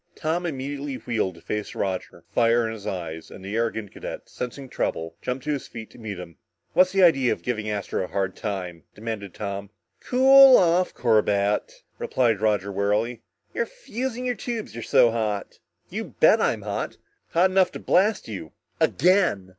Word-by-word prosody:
Tom 170 +3 -1
immediately 140 -1 -4
wheeled 110 -7 -2
to 85 - -15
face 105 +3 -4
Roger, 95 -2 -3
fire 115 0 +3
in 110 - -3
his 105 -2 -8
eyes, 85 -4 -5
and 95 - -11
the 100 +2 -4
arrogant 110 -3 -1
cadet, - - -7
sensing 130 +2 -6
trouble, 80 -8 -3
jumped 125 +1 -3
to 150 - 0
his 145 -3 -3
feet 110 -2 -9
to - - -15
meet 105 -4 -5
him. 85 -2 -10 0.4
"What's 185 0 +5
the 195 0 +3
idea 135 -8 +5
of - - -3
giving 110 -3 -2
Astro 100 -2 -2
a - - -9
hard 95 -1 -2
time?" 90 -6 -4
demanded 105 -3 -6
Tom. 100 -1 -5 0.3
"Cool 265 +1 +7
off, 180 +1 +3
Corbett," 105 -3 +1 0.2
replied 115 -5 +1
Roger 105 -2 +1
warily. 105 +4 0 0.3
"You're 470 - -1
fusing 260 - -5
your 250 - +1
tubes 230 0 -5
you're 115 - -6
so 115 +1 +4
hot." 110 -3 -3 0.3
"You - - -5
bet - - +6
I'm - - 0
hot! - - -4 0.4
Hot 180 +3 +4
enough 185 -1 +3
to - - -6
blast 205 +4 +2
you 95 -8 -7 0.3
again!" 175 - +3
115 Hz, 175 wpm, -25 LUFS, 100-170 Hz, 0.4 s, Cool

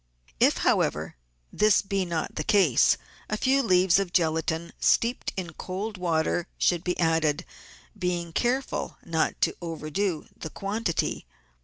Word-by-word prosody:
If, - - +4
however, - - +1 0.4
this 210 -1 +4
be 195 -1 -1
not 165 -3 -3
the 155 - -3
case, 175 - +4 0.3
a 215 - -1
few 270 +4 +3
leaves 185 -5 +4
of 195 -3 -2
gelatine 160 -1 0
steeped 235 +2 +2
in 175 -3 -4
cold 195 +7 -5
water 170 -1 0
should 175 -1 +2
be 180 -1 -2
added, 160 -1 +1 0.5
being 175 -3 -2
careful 255 +6 -1
not 160 -1 0
to - - +2
overdo 165 +1 -3
the 160 - -7
quantity. 195 -1 -2
180 Hz, 135 wpm, -26 LUFS, 160-200 Hz, 0.5 s, If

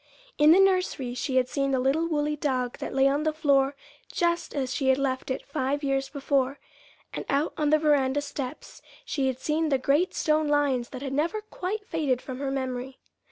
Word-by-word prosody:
In 300 +1 +6
the 355 - +7
nursery 365 -10 +2
she 260 +1 -3
had 255 -1 +3
seen 275 +1 -1
the 265 -1 +1
little 280 +6 +1
woolly 300 -2 0
dog 255 -4 -2
that - - -5
lay 270 0 +5
on 280 +2 +1
the 310 0 +1
floor 280 -3 +2 0.4
just 340 -2 -1
as 265 -3 -1
she 270 - -1
had 265 0 +4
left 265 -1 -2
it 260 - -3
five 280 +1 -2
years 270 -1 0
before; 275 -1 0 0.6
and - - -4
out 285 +3 +1
on 300 -1 0
the 310 - +5
veranda 290 -2 +2
steps 285 -1 -7 0.2
she 275 -3 -1
had 260 -2 -1
seen 310 +3 0
the 275 - +3
great 285 +7 +1
stone 310 0 +1
lions 285 -5 +1
that 260 +1 -7
had 270 -1 -4
never 330 +9 0
quite 420 0 -5
faded 290 -8 0
from 255 0 -7
her 275 -1 -2
memory. 260 -1 -4
280 Hz, 205 wpm, -27 LUFS, 265-305 Hz, 0.6 s, the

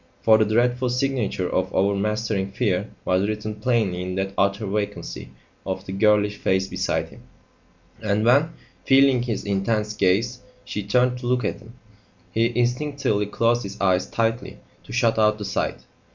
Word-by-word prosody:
For 110 -1 +6
the 110 - +4
dreadful 120 +3 +1
signature 125 -7 -1
of 95 - -1
overmastering 100 0 0
fear - - 0 0.2
was 95 +2 +2
written 110 0 -3
plainly 105 -5 0
in 90 0 -4
that 95 0 -2
utter 100 +2 +1
vacancy 100 +1 -4 0.3
of 95 0 -4
the - - -6
girlish 105 +1 +2
face 95 0 +1
beside - - -2
him; - - -15 0.8
and 105 0 0
when, 140 +7 +4 0.3
feeling 135 -2 +5
his 120 -4 -3
intense 105 +2 0
gaze, 105 +6 +1 0.3
she 105 -4 -4
turned 125 +4 +1
to 125 - -5
look 125 -2 +1
at - - -2
him, 110 +2 -15 0.6
he 115 +2 +1
instinctively 125 -4 0
closed 115 +3 +1
his 100 -1 -7
eyes 95 -1 +2
tightly 115 +1 -1 0.3
to - - -12
shut 115 -2 +2
out 105 0 +3
the 105 - -6
sight. 65 -10 -2
105 Hz, 160 wpm, -23 LUFS, 100-120 Hz, 0.8 s, For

